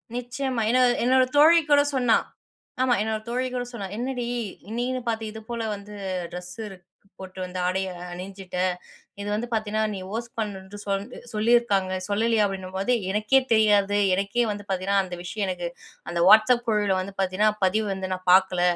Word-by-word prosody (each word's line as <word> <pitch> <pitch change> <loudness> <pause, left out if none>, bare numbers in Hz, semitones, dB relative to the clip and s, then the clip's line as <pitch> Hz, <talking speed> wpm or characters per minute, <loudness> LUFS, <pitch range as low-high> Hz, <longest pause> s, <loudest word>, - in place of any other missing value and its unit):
நிச்சயமா, 245 0 -2
என்னோட 250 +1 +5 0.2
என்னோட 255 +1 +4
தோழி 330 +3 +8
கூட 285 0 +7
சொன்னா 245 -3 +4 0.6
ஆமா 255 -1 +3
என்னோட 220 0 -1
தோழி 255 +2 -1
கூட 245 0 -2
சொன்னா 205 -5 -5
"என்னடி 250 0 -3 0.5
நீன்னு 255 +1 -1
பார்த்து 225 -1 -1
இது 220 - -8
போல 235 -1 -3
வந்து 205 +1 -9 0.4
ட்ரெஸ்ஸு 180 +6 -7 0.5
போட்டு 190 0 -9
வந்து 180 0 -6
ஆடையை 190 0 -1 0.2
அணிஞ்சிட்ட. 185 0 -8 0.6
இது 200 - -5
வந்து 225 +3 -2
பார்த்தீன்னா 215 0 0
நீ 195 - -5
ஹோஸ்ட் 235 +2 -5
பண்ணுன்னு 205 -1 -5
சொல் 195 0 -1 0.3
சொல்லியிருக்காங்க 215 -4 +2 0.2
சொல்லலையா?" 220 +1 +2
அப்படின்னும்போது 195 +3 -2 0.2
"எனக்கே 215 +6 +3
தெரியாது 205 -2 +4 0.2
எனக்கே 200 +5 0
வந்து 205 0 -6
பார்த்தீங்கன்னா 195 +1 +1
அந்த 180 -1 -7
விஷயம் 200 +2 -3
எனக்கு 175 -1 -3 0.4
அந்த 170 0 -1
WhatsApp 220 +3 +6
குழுவுல 205 -3 +2
வந்து 195 +1 -7
பார்த்தீங்கன்னா 195 +3 +2
பதிவு 210 +3 +1
வந்து 190 -1 -5
நான் 185 0 -7
பார்க்கல." 185 -1 +4
210 Hz, 155 wpm, -25 LUFS, 190-235 Hz, 0.6 s, தோழி